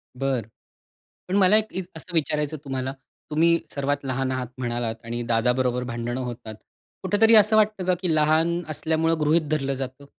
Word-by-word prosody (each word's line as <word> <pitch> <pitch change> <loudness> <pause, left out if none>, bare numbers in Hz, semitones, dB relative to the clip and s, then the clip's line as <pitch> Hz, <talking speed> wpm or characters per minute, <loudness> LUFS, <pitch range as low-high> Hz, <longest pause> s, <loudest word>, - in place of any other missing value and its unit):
बरं. 130 -4 -1 0.8
पण 185 - -1
मला 200 +2 +6
एक 220 0 +2
इत 190 - -3
असं 175 +3 -7
विचारायचं 150 -1 0
तुम्हाला, 135 -1 -3 0.4
तुम्ही 170 +2 +3 0.2
सर्वात 140 0 0
लहान 130 0 -2
आहात 130 -1 -2
म्हणालात 120 -2 -2
आणि 120 +1 -4
दादाबरोबर 125 +2 +1
भांडणं 120 +1 -4
होतात. 120 -3 -6 0.5
कुठेतरी 215 +4 +4
असं 215 0 +6
वाटतं 215 -3 +2
का 185 - +3
की 175 -3 +1
लहान 160 +3 +2
असल्यामुळं 160 +1 0
गृहीत 155 0 +2
धरलं 140 -3 0
जातं, 135 +1 -6
145 Hz, 160 wpm, -24 LUFS, 125-170 Hz, 0.8 s, मला